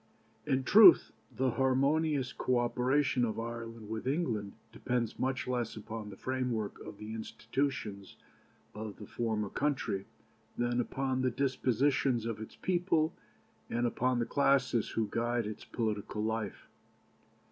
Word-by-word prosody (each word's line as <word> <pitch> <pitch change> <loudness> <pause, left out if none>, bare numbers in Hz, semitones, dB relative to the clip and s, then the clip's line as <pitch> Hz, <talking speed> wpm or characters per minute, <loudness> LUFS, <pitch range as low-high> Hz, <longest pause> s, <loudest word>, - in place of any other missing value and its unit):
"In 135 -2 +2
truth 195 +3 +8 0.2
the 130 -1 0
harmonious 135 +2 +2
co 125 - +1
operation 125 +2 +2
of 115 -1 -1
Ireland 115 -1 -6
with 110 +3 -4
England 120 - -1 0.2
depends 120 -3 -2
much 130 0 -1
less 120 -3 -1
upon 110 0 -6
the 95 - -10
framework 125 -5 -2
of - - -9
the 105 +1 -7
institutions 110 -3 -3 0.6
of 105 -1 -6
the 105 - -10
former 110 -1 -2
country 135 -9 -1 0.5
than 120 0 +1
upon 130 +1 -1
the 130 - +2
dispositions 130 -1 +1
of 115 -2 -3
its 110 - -8
people 175 -3 +1 0.6
and 120 +1 0
upon 125 +1 +1
the 120 - +1
classes 135 -5 +2
who 110 -1 -1
guide 120 0 0
its 105 0 -6
political 105 -2 -2
life. 110 -2 -3
120 Hz, 135 wpm, -32 LUFS, 110-130 Hz, 0.6 s, truth